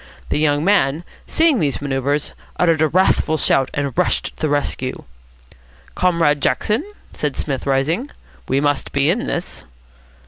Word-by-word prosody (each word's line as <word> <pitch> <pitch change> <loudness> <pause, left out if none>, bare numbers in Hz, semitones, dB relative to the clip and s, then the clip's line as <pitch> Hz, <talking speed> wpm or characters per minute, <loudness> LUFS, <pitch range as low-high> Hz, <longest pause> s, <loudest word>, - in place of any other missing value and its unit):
The - - 0
young 150 0 +1
man, 165 -6 +2 0.2
seeing 320 -6 +3
these 145 -3 0
manoeuvres, 140 +1 -1 0.2
uttered 165 -3 +2
a 155 - +4
wrathful 160 -1 +2
shout, 135 -2 +2
and 140 -2 -2
rushed 180 - +1
to - - -16
the 155 - +1
rescue. 140 -3 -2 0.9
"Comrade 165 -5 +2
Jackson," 220 - +1 0.3
said 150 -3 -2
Psmith, 140 -2 -3
rising, 155 - 0 0.4
"we 135 - +2
must 145 -1 -1
be 140 +3 +3
in 240 +8 -2
this." 175 - -4
150 Hz, 145 wpm, -19 LUFS, 140-175 Hz, 0.9 s, a